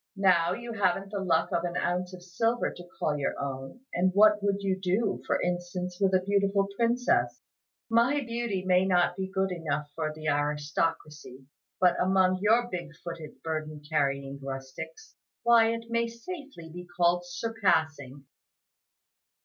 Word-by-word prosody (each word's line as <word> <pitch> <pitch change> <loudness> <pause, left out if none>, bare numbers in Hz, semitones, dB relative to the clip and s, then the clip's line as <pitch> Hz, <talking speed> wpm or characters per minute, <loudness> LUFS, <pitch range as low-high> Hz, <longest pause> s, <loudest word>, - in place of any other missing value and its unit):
Now 180 -3 +4
you 235 +1 -6
haven't 195 -1 0
the 205 - -2
luck 170 -4 +1
of 170 - 0
an 175 0 -2
ounce 180 +1 -1
of 180 -1 -11
silver 225 +7 0
to 175 0 -12
call 150 -1 0
your 140 - -2
own; 135 - -5
and 185 +2 +2
what 210 0 +6
would 200 0 0
you 190 -1 +1
do, 190 +5 0
for - - +1
instance, 180 0 -3
with 195 -1 +4
a 185 - +2
beautiful 200 0 +2
princess? 240 +3 +1 0.4
My 235 +5 +3
beauty 230 -6 -3
may 185 0 +4
not 180 -2 +2
be 190 0 -3
good 190 0 0
enough 150 -4 -3
for 155 -1 -2
the 155 0 -7
aristocracy; 150 -1 -2 0.3
but 180 -1 +4
among 185 0 +3
your 225 +4 +4
big 175 -6 -6
footed, 170 -3 -8
burden 155 -2 -4
carrying 140 -2 -1
rustics, 135 - -7 0.3
why 235 -1 +6
it 230 0 -4
may 235 0 +1
safely 235 - -9
be 180 0 -8
called 175 0 +3
'surpassing. 160 - -1
180 Hz, 155 wpm, -28 LUFS, 160-205 Hz, 0.4 s, what